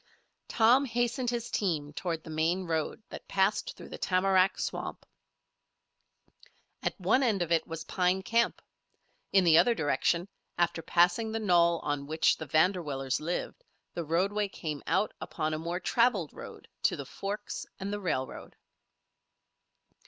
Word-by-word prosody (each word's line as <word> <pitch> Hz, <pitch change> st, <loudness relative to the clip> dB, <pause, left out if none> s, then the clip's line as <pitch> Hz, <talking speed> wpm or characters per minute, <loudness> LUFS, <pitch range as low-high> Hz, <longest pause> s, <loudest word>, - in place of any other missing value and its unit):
Tom 245 Hz, +5 st, +4 dB
hastened 240 Hz, 0 st, 0 dB
his 235 Hz, -1 st, -3 dB
team 155 Hz, -7 st, -1 dB
toward 165 Hz, 0 st, -3 dB
the 160 Hz, -, -9 dB
main 165 Hz, +4 st, 0 dB
road 165 Hz, +4 st, -2 dB
that -, -, -9 dB
passed 195 Hz, +1 st, 0 dB
through -, -, -11 dB
the -, -, -8 dB
tamarack 190 Hz, +1 st, +3 dB
swamp. -, -, -4 dB, 1.8 s
At -, -, -3 dB
one 260 Hz, -, +3 dB
end 215 Hz, -8 st, +2 dB
of 170 Hz, -, -6 dB
it 165 Hz, -, +2 dB
was 165 Hz, -1 st, -5 dB
Pine 185 Hz, +2 st, 0 dB
Camp; 230 Hz, +3 st, +1 dB, 0.7 s
in 195 Hz, -1 st, +5 dB
the 165 Hz, -2 st, +6 dB
other 235 Hz, +7 st, +4 dB
direction, 170 Hz, +3 st, +1 dB, 0.3 s
after 170 Hz, -1 st, +1 dB
passing 175 Hz, +7 st, +2 dB
the 225 Hz, -, -2 dB
knoll 170 Hz, -5 st, +4 dB
on 145 Hz, -1 st, -2 dB
which 155 Hz, +1 st, +3 dB
the 155 Hz, -, -7 dB
Vanderwillers 155 Hz, -5 st, +1 dB
lived, 175 Hz, -, -4 dB, 0.3 s
the 170 Hz, -, -3 dB
roadway 195 Hz, +6 st, 0 dB
came 155 Hz, -6 st, -5 dB
out 190 Hz, +5 st, +1 dB
upon 155 Hz, -1 st, -2 dB
a 155 Hz, -, -2 dB
more 170 Hz, +2 st, -3 dB
traveled 225 Hz, -, +1 dB
road -, -, -10 dB
to -, -, +2 dB
the 140 Hz, -, -6 dB
forks 200 Hz, +9 st, -5 dB
and 200 Hz, +1 st, -4 dB
the 205 Hz, -, -2 dB
railroad. 130 Hz, -8 st, -3 dB
180 Hz, 150 wpm, -30 LUFS, 160-205 Hz, 1.8 s, the